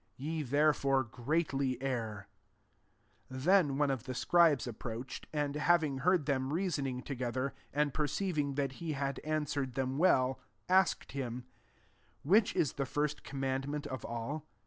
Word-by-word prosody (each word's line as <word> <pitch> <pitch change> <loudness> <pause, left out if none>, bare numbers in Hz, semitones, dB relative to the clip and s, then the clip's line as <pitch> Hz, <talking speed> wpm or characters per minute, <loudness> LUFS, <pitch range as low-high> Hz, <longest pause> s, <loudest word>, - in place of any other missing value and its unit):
Ye 155 +4 -3
therefore 140 -1 +2
greatly 135 +1 -1
err." 115 -6 -3 1.0
28 130 0 -6
Then 175 -7 +4
one 145 -1 +2
of 130 -3 -3
the 130 -2 -4
scribes 165 -2 +4
approached, 120 +1 -6
and, 145 -2 -1
having 150 -2 +2
heard 175 +1 +3
them 130 -2 0
reasoning 145 -7 -1
together, 130 0 -2 0.2
and 145 -1 +1
perceiving 150 -1 -1
that 140 -2 0
he 165 -2 -2
had 140 -1 -2
answer 150 -2 -1
ed 130 -2 -4
them 135 +1 -1
well, 130 -7 +3 0.3
asked 190 +1 +3
him, 125 -3 -4 0.4
" - - -35 0.3
Which 200 +8 +4
is 145 - +1
the 140 -1 -2
first 150 +2 -1
command 135 0 -2
ment 145 0 -3
of 130 -2 -5
all 140 +7 -4
140 Hz, 150 wpm, -33 LUFS, 130-150 Hz, 1.0 s, Then